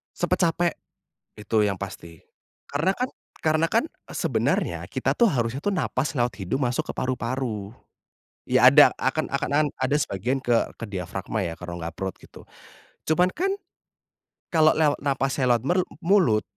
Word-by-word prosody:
Cepet - - 0
capek 170 +1 0 0.7
itu 110 +1 -1
yang 100 -2 -1
pasti. 85 -5 -8 0.5
Karena 165 +7 +1
kan 250 +5 -2 0.3
karena 155 +1 +2
kan 230 - +3 0.3
sebenarnya - - 0
kita - - 0
tuh 235 -3 +4
harusnya 125 0 -1
tuh 205 - +1
nafas 150 -5 -1
lewat 120 -6 0
hidung, 130 +9 -1
masuk 120 - -2
ke - - -16
paru-paru. 120 -5 -3 0.8
Ya, - - +5
ada - - +8
akan - - -1
akan 150 +1 +1
ada 130 +2 +1
sebagian 125 +5 -1
ke 120 -2 +1
ke - - -4
diafragma 95 +2 -3
ya, 85 - -3
ke 90 - -11
rongga 85 -1 -5
perut 95 +2 -5
gitu. - - -16 0.6
Cuman 180 +4 +3
kan 375 +4 -1 1.0
kalau 155 -2 +5
lewat 150 -2 +2
nafasnya 135 -1 0
lewat 115 - -3
peru 180 +6 +2 0.2
mulut, 170 - +4
130 Hz, 150 wpm, -25 LUFS, 105-155 Hz, 1.0 s, ada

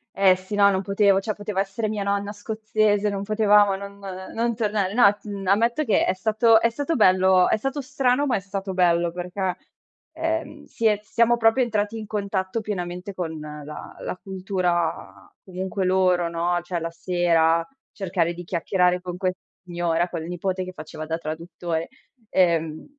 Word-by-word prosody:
Eh 195 -1 +5
sì, 185 +3 -7
no, 200 -1 +6
non 190 -1 +1
potevo, 195 0 +3
cioè 215 +2 -2
poteva 205 -1 -2
essere 200 +3 -3
mia 210 -1 -2
nonna 200 +1 -1
scozzese, 215 -1 0
non 200 -1 -2
potevamo 210 -1 +4
non, 200 0 -10
ehm, 190 -1 -7
non 235 +1 0
tornare. 205 -3 -1
No, 235 -3 +7
t 205 +1 -23 0.2
ammetto 230 +9 +2
che 220 - +3
è - - +1
stato 220 +3 +4
è 230 - +2
stato 285 +6 -2
bello 185 -2 +5
è - - +3
stato 270 +6 -3
strano, 270 0 +1
ma 265 - +1
è - - -1
stato 195 0 -5
bello, 175 -2 +2
perché, 180 +1 -3 0.6
ehm, 325 -2 -3
si 230 - -5
è 210 -2 +4
siamo 235 +2 +2
proprio 225 +3 +4
entrati 215 -1 -1
in 215 -1 -7
contatto 200 0 -2
pienamente 180 -2 -5
con 165 -4 -4
la 150 0 -9
la - - -4
cultura 180 - -2
comunque 190 +1 -3
loro, 185 -2 +3
no, 170 +1 0
cioè 175 0 -3
la 165 0 -3
sera 165 -1 +2 0.3
cercare 180 -4 -1
di 175 +1 -8
chiacchierare 180 +1 +1
con 180 -1 -6
questa 185 0 -2 0.2
signora, 175 -1 -1
col 165 -2 -5
nipote 185 +1 -2
che 185 - -8
faceva 155 -1 -8
da 160 +1 -2
traduttore, 165 +1 -4 0.4
ehm, 165 -4 +1
190 Hz, 170 wpm, -24 LUFS, 175-210 Hz, 0.6 s, No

